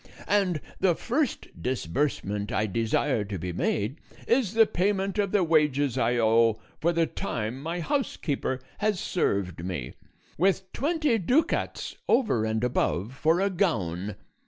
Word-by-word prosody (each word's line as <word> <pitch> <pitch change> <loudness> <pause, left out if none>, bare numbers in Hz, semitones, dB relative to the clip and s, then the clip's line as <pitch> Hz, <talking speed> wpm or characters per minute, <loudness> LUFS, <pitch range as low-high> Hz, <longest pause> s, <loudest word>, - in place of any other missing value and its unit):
And 190 -7 +2 0.2
the 180 -3 +3
first 260 - -1
disbursement 105 - -1
I 110 -1 +1
desire 115 +3 0
to 100 -1 -4
be 90 +1 -4
made 105 - -1 0.3
is 235 -4 +2
the 225 0 +7
payment 195 +1 0
of 200 -2 +1
the 205 -3 +3
wages 150 -5 +2
I 120 -1 +2
owe 115 -1 +4 0.2
for 170 - +2
the 165 -1 +2
time 125 - -4
my 170 +3 -3
housekeeper 150 - -1 0.2
has 210 -3 +1
served 100 - -1
me, 85 -9 -4 0.5
with 190 +1 +1
twenty 295 -5 +1
ducats, 250 - 0
over 215 - +3
and 110 +1 -1
above, 120 -3 0
for 160 +5 +2
a 200 0 +1
gown. 105 - -1
150 Hz, 140 wpm, -27 LUFS, -, 0.5 s, the